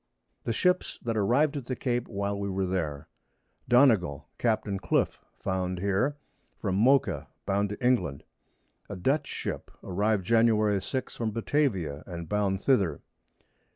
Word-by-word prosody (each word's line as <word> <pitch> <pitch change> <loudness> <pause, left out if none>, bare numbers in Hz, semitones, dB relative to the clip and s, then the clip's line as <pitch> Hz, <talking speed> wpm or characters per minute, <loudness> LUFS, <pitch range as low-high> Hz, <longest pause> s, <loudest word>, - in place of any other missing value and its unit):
The - - 0
Ships 180 +10 +1
that 115 -1 -1
arriv'd 125 +9 +2
at 130 -4 -6
the 130 - -2
Cape 120 -1 -1
while 100 -1 -2
we 100 0 -2
were 95 0 -1
there. 80 -6 -2 0.6
Donnegall, 110 - +4
Capt. 115 -2 +1 0.2
Cliff, 90 - 0 0.2
found 90 -1 -2
here, 100 +10 0 0.4
from 95 -3 -1
Mocha 105 - +3 0.2
bound 100 +1 +1
to 105 +5 -5
England. 90 - +1 0.7
A 100 - -5
Dutch 140 +11 +1
Ship, - - -5
arriv'd 100 +1 0
Jan. 110 -2 +3
6, 130 +5 -4
from 115 -2 -1
Batavia, 105 - 0
and 85 -2 -6
bound 100 0 0
thither. 95 - +2
105 Hz, 140 wpm, -28 LUFS, 95-120 Hz, 0.7 s, Donnegall